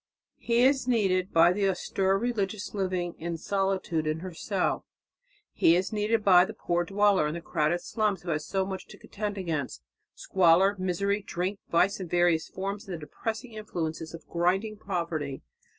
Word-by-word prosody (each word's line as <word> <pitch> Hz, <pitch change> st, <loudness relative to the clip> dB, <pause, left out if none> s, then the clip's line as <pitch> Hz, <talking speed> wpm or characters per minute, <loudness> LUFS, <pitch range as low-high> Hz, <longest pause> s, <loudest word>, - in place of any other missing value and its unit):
He 235 Hz, +1 st, +2 dB
is 265 Hz, -1 st, +3 dB
needed 190 Hz, -6 st, +1 dB
by 170 Hz, +2 st, +5 dB
the 195 Hz, 0 st, +1 dB
austere 190 Hz, +1 st, 0 dB
religious 210 Hz, -2 st, -2 dB
living 185 Hz, -3 st, -1 dB
in 170 Hz, 0 st, -3 dB
solitude 190 Hz, -3 st, -1 dB
in 155 Hz, +1 st, -1 dB
her 185 Hz, -1 st, -6 dB
cell.... 190 Hz, +3 st, -1 dB, 0.7 s
He 165 Hz, -, +5 dB
is 185 Hz, +4 st, -1 dB
needed 215 Hz, +1 st, +1 dB
by 180 Hz, -2 st, +8 dB
the -, -, -5 dB
poor 175 Hz, 0 st, 0 dB
dweller 200 Hz, -2 st, +3 dB
in 150 Hz, -, -3 dB
the -, -, -4 dB
crowded 165 Hz, +1 st, 0 dB
slums 210 Hz, -4 st, -1 dB
who 175 Hz, -, -3 dB
has 155 Hz, -1 st, -1 dB
so 190 Hz, -1 st, 0 dB
much 190 Hz, -1 st, -6 dB
to -, -, -13 dB
contend 205 Hz, -1 st, -5 dB
against 160 Hz, -8 st, -3 dB, 0.3 s
squalor, 190 Hz, +2 st, +4 dB
misery, 200 Hz, +3 st, 0 dB
drink, 195 Hz, +1 st, -3 dB
vice 185 Hz, +4 st, +2 dB
in 185 Hz, -, -5 dB
various 175 Hz, -2 st, +2 dB
forms, 195 Hz, +3 st, -4 dB
and 185 Hz, -, -4 dB
the -, -, -7 dB
depressing 225 Hz, -, -5 dB
influences 165 Hz, -6 st, -4 dB
of 165 Hz, -, -12 dB
grinding 190 Hz, +5 st, 0 dB
poverty. 165 Hz, -9 st, -3 dB
190 Hz, 170 wpm, -28 LUFS, 170-205 Hz, 0.7 s, by